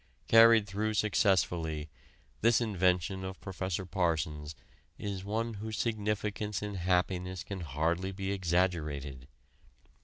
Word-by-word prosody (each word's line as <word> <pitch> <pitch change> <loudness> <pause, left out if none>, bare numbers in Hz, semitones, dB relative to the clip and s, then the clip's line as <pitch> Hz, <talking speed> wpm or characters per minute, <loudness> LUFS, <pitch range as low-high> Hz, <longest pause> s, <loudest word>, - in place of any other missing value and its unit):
Carried 115 -1 +7
through 105 +2 -2
successfully, 90 -7 +1 0.5
this 115 +1 +5
invention 95 -4 +1
of 95 0 -6
Prof. 95 -1 -9 0.3
Parsons' 80 -5 -1 0.4
is 100 -2 -4
one 110 +3 -2
whose 110 +1 -5
significance 105 -2 -2
in 105 0 -4
happiness 90 0 0
can 100 -2 -6
hardly 85 +4 -1
be 95 0 -3
exaggerated. 80 -8 -1
95 Hz, 110 wpm, -31 LUFS, 85-105 Hz, 0.5 s, Carried